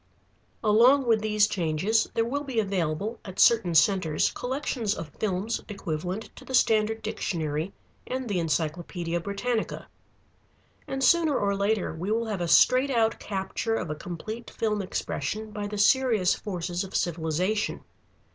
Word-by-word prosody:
Along 240 Hz, +6 st, +5 dB
with 225 Hz, -2 st, +3 dB
these 215 Hz, -1 st, +3 dB
changes, 185 Hz, +4 st, 0 dB
there 225 Hz, -, +2 dB
will 285 Hz, +5 st, -2 dB
be 265 Hz, -5 st, -2 dB
available 195 Hz, +2 st, -1 dB
at 190 Hz, -1 st, -9 dB
certain 220 Hz, -8 st, +5 dB
centres 160 Hz, -2 st, +3 dB
collections 245 Hz, -5 st, -2 dB
of 165 Hz, -, -6 dB
films 205 Hz, +2 st, -1 dB
equivalent 185 Hz, +1 st, -4 dB
to -, -, -11 dB
the 260 Hz, -, -3 dB
Standard 220 Hz, -2 st, +2 dB
Dictionary 165 Hz, -6 st, -2 dB, 0.4 s
and 255 Hz, 0 st, -3 dB
the 200 Hz, -4 st, -1 dB
Encyclopædia 170 Hz, +2 st, -2 dB
Britannica. 210 Hz, +5 st, -2 dB, 1.0 s
And 270 Hz, 0 st, -3 dB
sooner 320 Hz, -2 st, +4 dB
or 200 Hz, -1 st, +1 dB
later 200 Hz, +1 st, 0 dB
we 170 Hz, +5 st, -4 dB
will 230 Hz, +2 st, +1 dB
have 210 Hz, -5 st, -3 dB
a 175 Hz, -, -1 dB
straight 255 Hz, +10 st, +5 dB
out 225 Hz, -3 st, +1 dB
capture 200 Hz, +3 st, -2 dB
of 165 Hz, -8 st, -3 dB
a -, -, -3 dB
complete 215 Hz, +9 st, -7 dB
film 210 Hz, -2 st, -1 dB
expression 215 Hz, +2 st, -3 dB
by 205 Hz, -1 st, -4 dB
the 210 Hz, 0 st, -5 dB
serious 220 Hz, -4 st, +4 dB
forces 180 Hz, -2 st, -3 dB
of 190 Hz, -, -8 dB
civilization. 175 Hz, +5 st, -1 dB
210 Hz, 145 wpm, -27 LUFS, 175-225 Hz, 1.0 s, Along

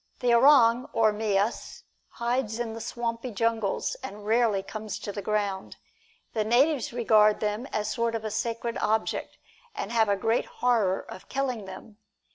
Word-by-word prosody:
The 245 Hz, -1 st, +2 dB
orang, 245 Hz, -1 st, +5 dB
or 220 Hz, -2 st, +3 dB
mias, 210 Hz, 0 st, -1 dB, 0.3 s
hides 235 Hz, -2 st, -2 dB
in 235 Hz, -2 st, -3 dB
the 225 Hz, -, -7 dB
swampy 235 Hz, +1 st, -4 dB
jungles, 225 Hz, -2 st, -1 dB
and -, -, -6 dB
very 210 Hz, 0 st, -12 dB
rarely 220 Hz, -3 st, +2 dB
comes 215 Hz, 0 st, -6 dB
to 205 Hz, -, -6 dB
the 205 Hz, -, -5 dB
ground. 200 Hz, -1 st, -2 dB, 0.6 s
The 220 Hz, -, 0 dB
natives 255 Hz, +5 st, +2 dB
regard 215 Hz, -3 st, +4 dB
them 215 Hz, +4 st, -2 dB
as 210 Hz, -5 st, -2 dB
a -, -, -2 dB
sort 230 Hz, -1 st, -1 dB
of 215 Hz, -2 st, -4 dB
sacred 230 Hz, +1 st, -2 dB
object, 220 Hz, +1 st, -1 dB, 0.4 s
and 200 Hz, -, -4 dB
have 225 Hz, -3 st, +3 dB
a 200 Hz, -, +3 dB
great 225 Hz, +4 st, +1 dB
horror 220 Hz, -7 st, +1 dB
of 185 Hz, -, -12 dB
killing 255 Hz, -6 st, -2 dB
them. 205 Hz, +3 st, -11 dB
225 Hz, 165 wpm, -27 LUFS, 210-235 Hz, 0.6 s, orang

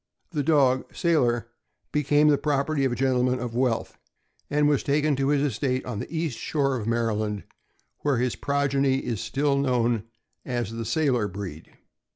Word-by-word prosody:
The 150 Hz, -4 st, -1 dB
dog, 135 Hz, -4 st, +2 dB
Sailor, 120 Hz, -9 st, +2 dB, 0.4 s
became 150 Hz, 0 st, +3 dB
the 145 Hz, -, +4 dB
property 145 Hz, -1 st, 0 dB
of 130 Hz, -, +1 dB
a -, -, -1 dB
gentleman 125 Hz, 0 st, +1 dB
of 120 Hz, -2 st, -4 dB
wealth, 120 Hz, -2 st, -1 dB, 0.5 s
and 150 Hz, 0 st, +3 dB
was 145 Hz, -2 st, +2 dB
taken 145 Hz, +1 st, +1 dB
to 135 Hz, 0 st, +1 dB
his 145 Hz, 0 st, +2 dB
estate 130 Hz, -1 st, -1 dB
on 120 Hz, -5 st, -4 dB
the -, -, -6 dB
east 160 Hz, -6 st, -2 dB
shore 135 Hz, -3 st, 0 dB
of 110 Hz, -4 st, -4 dB
Maryland, 110 Hz, -3 st, -1 dB, 0.6 s
where 145 Hz, -4 st, +1 dB
his 125 Hz, 0 st, 0 dB
progeny 140 Hz, -1 st, +1 dB
is 115 Hz, -4 st, -2 dB
still 140 Hz, 0 st, 0 dB
known 120 Hz, -5 st, +1 dB, 0.4 s
as 120 Hz, -4 st, -3 dB
the 115 Hz, 0 st, -5 dB
Sailor 125 Hz, -3 st, +1 dB
breed. 95 Hz, -5 st, -8 dB
130 Hz, 165 wpm, -26 LUFS, 120-145 Hz, 0.6 s, the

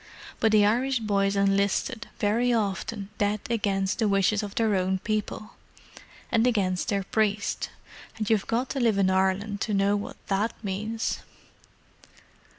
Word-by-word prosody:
But 225 Hz, -, +3 dB
the 210 Hz, -1 st, +5 dB
Irish 250 Hz, +5 st, +2 dB
boys 200 Hz, -3 st, +1 dB
enlisted, 200 Hz, +4 st, +1 dB
very 230 Hz, +4 st, +2 dB
often, 205 Hz, -2 st, -2 dB
dead 205 Hz, +1 st, +1 dB
against 195 Hz, -3 st, 0 dB
the 220 Hz, -, +2 dB
wishes 200 Hz, +1 st, +2 dB
of 205 Hz, -2 st, -6 dB
their 225 Hz, -2 st, +2 dB
own 190 Hz, 0 st, +1 dB
people, 215 Hz, +2 st, -3 dB, 0.8 s
and 230 Hz, 0 st, +3 dB
against 190 Hz, -6 st, +1 dB
their 200 Hz, -2 st, 0 dB
priest—and 210 Hz, +1 st, -3 dB
you've 215 Hz, -3 st, +1 dB
got 240 Hz, +3 st, -1 dB
to 275 Hz, -, -2 dB
live 230 Hz, -5 st, +2 dB
in 190 Hz, -1 st, +3 dB
Ireland 190 Hz, +2 st, 0 dB
to 210 Hz, -, 0 dB
know 200 Hz, +1 st, +3 dB
what 205 Hz, -, -5 dB
that 205 Hz, +3 st, 0 dB
means." 215 Hz, +3 st, -2 dB
205 Hz, 145 wpm, -26 LUFS, 195-220 Hz, 0.8 s, the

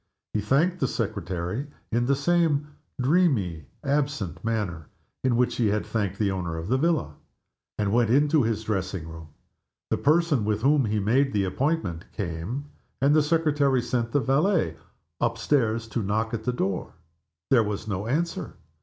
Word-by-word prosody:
He 105 Hz, -, 0 dB
thanked 160 Hz, -, +2 dB
the 135 Hz, -, +2 dB
secretary 100 Hz, -, -3 dB, 0.2 s
in 120 Hz, +1 st, +1 dB
the 140 Hz, -, +3 dB
same 150 Hz, -1 st, +2 dB, 0.3 s
dreamy, 125 Hz, -, +2 dB, 0.2 s
absent 140 Hz, -, -1 dB
manner 100 Hz, -9 st, -2 dB, 0.4 s
in 130 Hz, -2 st, +2 dB
which 125 Hz, +1 st, +1 dB
he 115 Hz, -, +2 dB
had 105 Hz, +1 st, 0 dB
thanked 100 Hz, -4 st, -2 dB
the 100 Hz, -2 st, +1 dB
owner 85 Hz, -3 st, -3 dB
of 80 Hz, +4 st, -5 dB
the 130 Hz, -, +3 dB
villa, 160 Hz, -, +1 dB, 0.6 s
and 105 Hz, -1 st, 0 dB
went 120 Hz, -2 st, +3 dB
into 145 Hz, +4 st, +4 dB
his 110 Hz, -2 st, -1 dB
dressing 95 Hz, -5 st, -2 dB
room. 80 Hz, -1 st, -9 dB, 0.6 s
The -, -, +2 dB
person 155 Hz, -5 st, +3 dB
with 105 Hz, +1 st, -1 dB
whom 140 Hz, -1 st, +4 dB
he 110 Hz, 0 st, -1 dB
had 100 Hz, -2 st, -1 dB
made 135 Hz, +5 st, +3 dB
the 100 Hz, -, +2 dB
appointment 95 Hz, -, -1 dB
came, 100 Hz, -, -4 dB, 0.3 s
and 140 Hz, +3 st, +4 dB
the 155 Hz, -, +6 dB
secretary 145 Hz, -4 st, +2 dB
sent 120 Hz, -1 st, -1 dB
the 145 Hz, -, +3 dB
valet 135 Hz, -, +2 dB, 0.4 s
up 115 Hz, -1 st, 0 dB
stairs 115 Hz, -3 st, +1 dB
to 115 Hz, -, -1 dB
knock 110 Hz, +3 st, -1 dB
at 110 Hz, -1 st, -3 dB
the 125 Hz, -, +1 dB
door. 95 Hz, -5 st, -2 dB, 0.6 s
There 125 Hz, -3 st, +6 dB
was 105 Hz, +1 st, -4 dB
no 100 Hz, 0 st, -3 dB
answer. 165 Hz, +7 st, -2 dB
115 Hz, 170 wpm, -26 LUFS, 100-140 Hz, 0.6 s, the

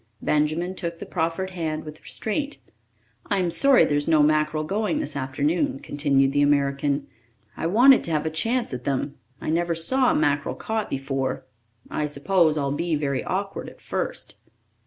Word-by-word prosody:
Benjamin 155 Hz, +4 st, +1 dB
took 170 Hz, -2 st, -5 dB
the -, -, -7 dB
proffered 170 Hz, +4 st, -2 dB
hand 160 Hz, -3 st, -3 dB
with 155 Hz, 0 st, -10 dB
restraint. 285 Hz, +6 st, -3 dB, 0.7 s
"I'm 185 Hz, -4 st, 0 dB
sorry 265 Hz, +11 st, +6 dB
there's 145 Hz, 0 st, 0 dB
no 155 Hz, -2 st, +5 dB
mackerel 155 Hz, 0 st, +2 dB
going 200 Hz, +3 st, -1 dB
this 145 Hz, -, -3 dB
afternoon," 140 Hz, +3 st, 0 dB
continued 140 Hz, -2 st, +1 dB
the 145 Hz, +1 st, +2 dB
American. 140 Hz, 0 st, +1 dB, 0.5 s
"I -, -, -2 dB
wanted 245 Hz, +9 st, +6 dB
to 170 Hz, -, -2 dB
have 155 Hz, 0 st, 0 dB
a 160 Hz, -, -1 dB
chance 230 Hz, -, 0 dB
at 125 Hz, -1 st, -5 dB
them. 140 Hz, 0 st, -2 dB, 0.2 s
I -, -, -3 dB
never 170 Hz, +1 st, 0 dB
saw 255 Hz, +11 st, +2 dB
mackerel 145 Hz, -2 st, +1 dB
caught 220 Hz, -1 st, -3 dB
before. 135 Hz, 0 st, -3 dB, 0.5 s
I 150 Hz, -, -1 dB
suppose 155 Hz, +2 st, +2 dB
I'll 140 Hz, -2 st, 0 dB
be 165 Hz, +3 st, -1 dB
very 140 Hz, -3 st, -1 dB
awkward 195 Hz, +1 st, -3 dB
at -, -, -18 dB
first." -, -, -3 dB
155 Hz, 160 wpm, -24 LUFS, 145-180 Hz, 0.7 s, sorry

